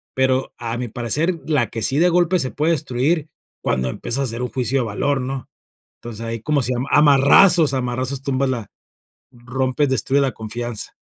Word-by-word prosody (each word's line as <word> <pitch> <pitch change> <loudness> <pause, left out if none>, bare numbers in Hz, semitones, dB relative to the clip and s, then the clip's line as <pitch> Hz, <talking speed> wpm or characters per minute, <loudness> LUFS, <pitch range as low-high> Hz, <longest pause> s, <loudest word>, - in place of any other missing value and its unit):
Pero, 130 0 +1
a 115 0 -4
mi 125 0 -3
parecer 150 +10 -1
la 140 -9 +1
que 115 - -5
sí 135 - +1
de 175 - +5
golpe 175 +1 +2
se 130 -4 -2
puede 155 +3 0
destruir, 150 +3 -1 0.3
cuando 65 0 -1
empiezas 120 - -3
a - - +1
hacer 115 -1 -3
un 125 - -3
juicio 130 +1 -1
de 120 - -2
valor, 140 +7 -1
¿no?, 130 0 -5 0.5
entonces, 115 -2 -8
ahí, 115 0 -4
¿cómo 145 +2 +1
se 125 +2 -1
llama?, 125 +3 -3
a - - +6
marrazos, 150 +3 +6
a 130 - 0
marrazos, 130 +2 -2
tumbas 135 -1 0
la 120 -5 -4 0.6
rompes, 130 +3 -1
destruye 135 +3 +1
la 135 -4 0
confianza. 115 +1 -5
130 Hz, 195 wpm, -20 LUFS, 120-145 Hz, 0.6 s, a